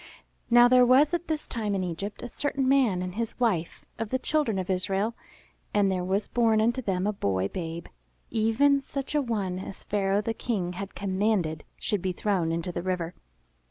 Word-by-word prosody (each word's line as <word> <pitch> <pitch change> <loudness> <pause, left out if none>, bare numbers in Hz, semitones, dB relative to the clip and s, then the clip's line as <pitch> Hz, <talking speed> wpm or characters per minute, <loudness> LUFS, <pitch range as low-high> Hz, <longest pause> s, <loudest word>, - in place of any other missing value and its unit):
Now 240 0 +8
there 250 0 +6
was 265 +6 +5
at 345 0 -1
this 310 -2 -2
time 215 -4 -2
in 190 - -1
Egypt 185 +4 -5
a - - -3
certain 275 +1 -1
man 250 -10 +3
and 180 0 -5
his 230 +3 -4
wife 190 -9 0
of 225 -2 -2
the 260 - +1
Children 280 -6 0
of 185 -1 -2
Israel, 195 +4 0 0.6
and 200 -2 +4
there 185 -1 -1
was 195 +3 0
born 225 -2 +3
unto 235 +4 +2
them 190 -5 -1
a 210 - +1
boy 95 - 0
babe, 165 -1 -5 0.5
even 260 +6 +3
such 275 +1 -5
a 300 - +3
one 200 -8 -2
as 190 0 -8
Pharaoh 200 -1 +1
the 225 +2 -2
King, 195 -7 -2
had 195 +2 -7
commanded 190 -5 0
should 205 -3 -1
be 185 0 -1
thrown 180 -4 0
into 170 +2 -2
the 175 - -3
river. 180 -2 -2
205 Hz, 195 wpm, -27 LUFS, 185-240 Hz, 0.6 s, Now